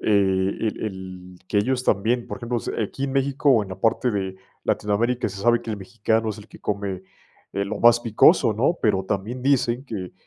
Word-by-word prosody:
el 100 +1 +1
el 95 -3 -7
que 105 - +2
ellos 125 +4 0
también, 115 +4 +1
por - - -6
ejemplo, 120 0 -2
s - - -5
aquí 135 +6 -4
en 135 - -3
México 140 +1 +1
o 115 -5 +5
en 100 - -8
la 95 0 -8
parte 115 +3 +2
de 95 -2 -3 0.3
Latinoamérica 115 +4 0
se 95 - -9
sabe 120 +2 +3
que 115 - -6
el 105 - -2
mexicano 110 +2 -1
es 105 - -7
el 105 +1 -13
que - - -14
come, 100 -3 -3 0.5
eh, 100 +1 -1
lo 100 +2 -4
más 120 0 +6
picoso, 115 -1 +4
¿no? 130 - +1
Pero 100 -3 +2
también 105 +6 -3
dicen, 130 -2 +1
que 100 -9 -6
110 Hz, 205 wpm, -23 LUFS, 100-120 Hz, 0.5 s, más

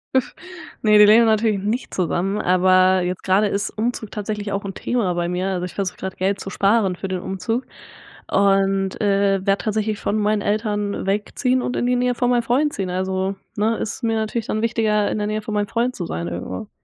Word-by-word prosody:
Üf, 260 - +2 0.5
ne, 215 -1 +5
die 210 - +9
leben 225 +3 +6
natürlich 220 -1 +2
nicht 220 +6 -3
zusammen, 185 +2 -1
aber 185 +1 +4
jetzt 180 +1 -3
gerade 195 +2 +3
ist 200 +1 -1
Umzug 220 -1 -3
tatsächlich 210 -1 -4
auch 200 0 -2
'n 195 - -4
Thema 205 -2 -1
bei 175 0 -1
mir, 180 +2 -1
also 180 -2 -2
ich 180 - -10
versuche 195 -2 -3
gerade 190 0 -5
Geld 195 +1 -1
zu - - -6
sparen 195 -1 +2
für 195 - -5
den 185 -1 -2
Umzug 225 +7 -3 0.6
und, 195 -1 +2
äh, 195 -1 +2
werde 195 0 +3
tatsächlich 215 -1 -1
von 205 - -1
meinen 210 0 +1
Eltern 205 -2 -1
wegziehen 235 +6 0
und 245 - -2
in - - 0
die 250 0 +2
Nähe 250 0 +1
von 245 0 0
meinem 240 -1 +2
Freund 280 +6 +1
ziehen, 195 -2 -3
also 190 +1 -1 0.2
ne, 220 +2 +1
ist 225 - -4
mir 225 -1 +1
natürlich 220 +1 -2
dann 215 +1 -2
wichtiger, 215 -3 +1
in - - -2
der 210 - -1
Nähe 215 +1 -2
von 215 - -6
meinem 205 -1 0
Freund 240 +2 0
zu 175 - -4
sein 85 - -4
irgendwo. 90 +1 -6
205 Hz, 215 wpm, -21 LUFS, 190-220 Hz, 0.6 s, die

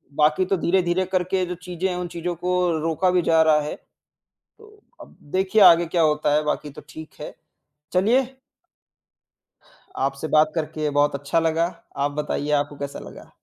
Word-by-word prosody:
बाकी 155 +5 +2
तो 195 0 0
धीरे-धीरे 180 +1 +1
करके 185 0 0
जो 180 - -5
चीज़ें 180 +1 -3
हैं 180 - -3
उन 180 -1 -4
चीज़ों 170 +1 -4
को 180 +2 -1 0.2
रोका 165 +3 0
भी 180 -1 +2
जा 160 0 +3
रहा 155 -1 +4
है, 150 - -5 0.6
तो 425 -1 -21 0.2
अब - - -14 0.2
देखिए 190 +3 +2
आगे 170 -2 +7
क्या 170 +1 0
होता 150 -1 +1
है, 150 - +2
बाकी 150 0 -2
तो - - -12
ठीक 155 +3 -10
है। - - -7 0.6
चलिए 220 +9 +3 1.8
आपसे 135 +3 -2
बात 155 0 +4
करके 155 -1 -2
बहुत 145 0 +1
अच्छा 140 +4 -1
लगा। 165 +2 0 0.2
आप 140 +1 0
बताइए 150 0 -3
आपको 145 0 0
कैसा 140 0 -5
लगा? - - -12
165 Hz, 170 wpm, -23 LUFS, 150-180 Hz, 1.8 s, आगे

